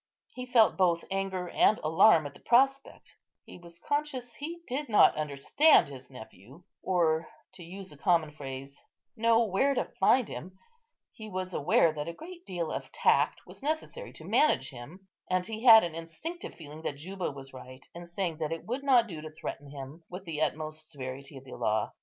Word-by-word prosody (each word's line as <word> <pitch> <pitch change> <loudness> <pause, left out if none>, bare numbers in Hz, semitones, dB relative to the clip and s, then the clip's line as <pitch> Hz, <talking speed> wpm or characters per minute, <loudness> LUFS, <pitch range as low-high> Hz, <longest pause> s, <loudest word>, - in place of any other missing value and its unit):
He 250 0 -7
felt 235 -3 +4
both 175 -3 +2
anger 195 -2 -2
and 215 - +4
alarm 160 +1 +5
at 145 - -7
the - - -16
prospect; 270 +3 +1 0.3
he - - -12
was 170 -1 -12
conscious 265 0 -3
he 335 +5 -7
did 275 +2 -3
not 210 - +6
understand 150 - +3
his 130 -2 -11
nephew, 125 - -13 0.2
or 165 -3 +1 0.2
(to 175 - -12
use 190 +2 -9
a 150 - -13
common 165 -1 +2
phrase) 135 -1 -8 0.3
know 230 0 +4
where 265 +8 +1
to - - 0
find 240 +5 +4
him; 180 +10 -8 0.5
he 220 -2 -10
was 185 -1 -4
aware 155 +2 +3
that 150 0 -5
a 170 - -4
great 345 - -12
deal 175 -4 -3
of - - -5
tact - - +2
was - - -13
necessary 315 - -3
to - - -12
manage 130 - +2
him; 150 +10 -12 0.2
and 185 0 +1
he 220 +4 -6
had 225 -2 +10
an 170 -2 -3
instinctive 165 - -7
feeling 155 -1 -11
that 145 -3 -4
Juba 185 +4 -4
was 135 -2 -10
right 130 0 -11
in 175 0 -9
saying 175 -2 -3
that 155 -1 -2
it 165 - -5
would 250 +5 -3
not 255 -4 +5
do 165 -8 -8
to 155 - -7
threaten 145 -2 -7
him 140 +3 -9
with 185 +2 -8
the 160 -3 -4
utmost 155 0 -3
severity 135 -1 -7
of 130 - -11
the 130 - -13
law. 110 0 -1
175 Hz, 190 wpm, -29 LUFS, 150-225 Hz, 0.5 s, had